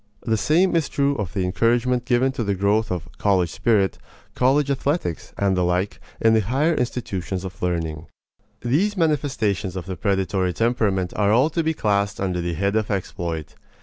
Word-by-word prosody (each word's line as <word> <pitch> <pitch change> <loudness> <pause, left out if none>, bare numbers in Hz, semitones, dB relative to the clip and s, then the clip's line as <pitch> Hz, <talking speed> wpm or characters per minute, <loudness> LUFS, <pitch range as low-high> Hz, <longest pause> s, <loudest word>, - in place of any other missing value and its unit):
The 110 - +1
same 170 - +2
is 165 -3 +1
true 140 0 +1
of 100 -6 -4
the 95 - 0
encouragement 120 +6 +1
given 125 +2 +2
to 125 - -3
the 100 -2 0
growth 105 +3 +1
of 85 -2 -3
"college 95 -5 +2
spirit," 105 -5 +1 0.3
college 140 +3 +2
athletics, 140 - -2
and 100 -1 +2
the 90 - +1
like, 90 +3 0 0.2
in 110 0 +4
the 110 - +5
higher 135 - +1
institutions 100 - -3
of 95 +1 -8
learning. 80 -3 -2 0.5
These 180 +13 +1
manifestations 130 - 0
of 95 - -5
the 95 0 -5
predatory 95 -1 0
temperament 105 -4 0
are 105 -1 +2
all 130 +8 +4
to 165 - 0
be 160 0 0
classed 100 -4 0
under 90 -2 -1
the 85 0 -2
head 100 +5 0
of 110 -1 0
exploit. 85 -5 -3
105 Hz, 180 wpm, -23 LUFS, 95-125 Hz, 0.5 s, the